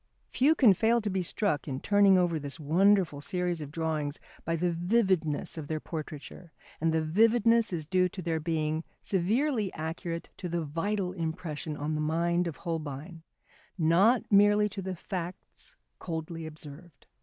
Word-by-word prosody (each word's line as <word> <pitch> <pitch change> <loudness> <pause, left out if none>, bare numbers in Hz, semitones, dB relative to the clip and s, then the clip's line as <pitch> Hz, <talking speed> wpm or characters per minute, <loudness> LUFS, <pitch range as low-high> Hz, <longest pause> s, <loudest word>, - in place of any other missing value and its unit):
Few 295 +5 +3
can 240 -10 +6
fail 230 +5 +2
to 210 -3 -3
be 190 0 0
struck 175 -3 -1
in 135 -2 -3
turning 200 0 +5
over 175 -3 +1
this 145 +2 -6
wonderful 170 0 +3
series 180 0 -2
of 145 - -6
drawings 155 -2 -2 0.2
by 165 - -1
the 175 +2 0
vividness 175 -4 0
of 150 - -7
their 155 0 -2
portraiture, 155 +2 -8 0.3
and 165 0 +2
the 160 0 +1
vividness 225 +6 +3
is 165 -4 -3
due 180 +2 +2
to 185 - -7
their 165 -1 -1
being 155 0 -1 0.2
severely 215 - 0
accurate 165 +2 -5
to 180 - -5
the 170 0 -1
vital 180 +5 -2
impression 160 -3 -4
on 150 +2 -2
the 155 - -1
mind 170 +3 +1
of 165 - -5
Holbein, 160 0 -5 0.6
not 190 +9 +4
merely 205 +1 +5
to 195 - -6
the 190 0 -4
facts 180 0 -7 0.2
coldly 165 0 -5
observed. 155 +1 -12
170 Hz, 160 wpm, -29 LUFS, 155-195 Hz, 0.6 s, can